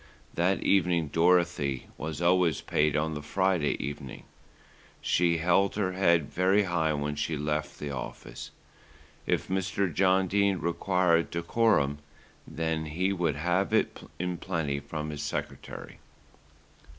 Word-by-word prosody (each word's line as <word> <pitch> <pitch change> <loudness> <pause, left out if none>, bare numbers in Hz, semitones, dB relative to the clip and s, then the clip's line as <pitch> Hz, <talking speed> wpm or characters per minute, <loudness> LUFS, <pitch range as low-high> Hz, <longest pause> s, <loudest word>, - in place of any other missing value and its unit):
That 90 +3 +1
evening, 85 -5 +2
Dorothy 85 -5 +2
was 80 +2 -5
always 85 -3 +3
paid 75 -1 +1
on 80 +1 0
the 75 - -5
Friday 90 0 +1
evening, 70 -2 -6 0.8
she 85 -1 +2
held 90 +4 +2
her 100 -3 0
head 85 -5 +3
very 95 +3 +3
high 85 -4 0
when 75 0 -2
she 75 +1 -2
left 75 +1 -2
the 75 -1 -5
office. 65 - -7 0.8
If - - 0
Mr. 95 -1 -1
John 95 +2 +3
Dene 100 0 +2
required 85 0 +1
decorum, 85 -5 +1 0.5
then 80 0 -2
he 90 +6 -1
should 85 -5 0
have 90 +6 +1
it - - 0 0.2
in 90 0 -2
plenty 80 -7 -2
from 75 +1 -5
his 75 -1 -5
secretary. 75 - -6
85 Hz, 130 wpm, -28 LUFS, 75-95 Hz, 0.8 s, always